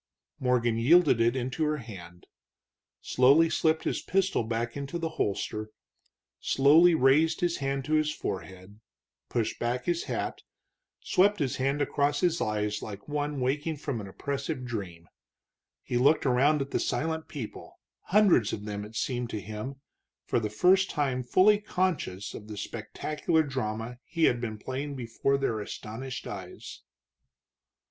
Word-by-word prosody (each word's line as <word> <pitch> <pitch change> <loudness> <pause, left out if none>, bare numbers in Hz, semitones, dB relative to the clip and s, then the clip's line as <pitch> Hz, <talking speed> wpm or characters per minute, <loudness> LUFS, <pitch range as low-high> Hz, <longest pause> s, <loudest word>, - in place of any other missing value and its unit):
Morgan 120 -3 +1
yielded 145 -1 +5
it 120 +2 +3
into 130 +4 -2
her 150 0 +1
hand, 90 -8 -11 0.8
slowly 140 +6 +4
slipped 160 0 +2
his - - -1
pistol 190 -8 +1
back 115 +1 -3
into 140 +4 -4
the 165 -1 -2
holster, 110 -5 -2 0.7
slowly 160 +5 +5
raised 155 +3 +3
his 175 -1 +1
hand 135 -1 -2
to 155 - -2
his 155 0 +3
forehead, 95 -4 -6 0.5
pushed 115 -2 -1
back 120 +1 -1
his 175 -1 0
hat, - - -3 0.6
swept 205 +3 +3
his 135 -4 -1
hand 135 +2 +1
across 145 0 0
his 175 -2 +1
eyes 105 -1 -1
like 100 -2 -8
one 145 -1 -2
waking 145 +5 -1
from 140 -6 -4
an 100 - -8
oppressive 140 - -4
dream. 95 -8 -6 0.8
He 120 - -1
looked 145 +6 +4
around 135 +3 +3
at 140 - -12
the - - 0
silent 160 0 -2
people, 130 -8 -8 0.3
hundreds 190 - +4
of 105 - -5
them, 105 -1 -4
it 105 +2 -11
seemed 125 0 -2
to 110 - -3
him, 110 +7 -7 0.4
for - - +1
the 110 -2 -2
first 185 - +4
time 135 -4 0
fully 190 +11 +4
conscious 180 - -2
of 105 - -9
the 105 -1 -7
spectacular 155 +9 -1
drama 125 -3 -4
he 165 -1 -2
had 120 -5 +3
been 110 -3 -4
playing 135 +5 -5
before 130 +2 0
their 125 -5 -1
astonished 115 +4 -6
eyes. 95 -3 -8
130 Hz, 150 wpm, -28 LUFS, 110-155 Hz, 0.8 s, yielded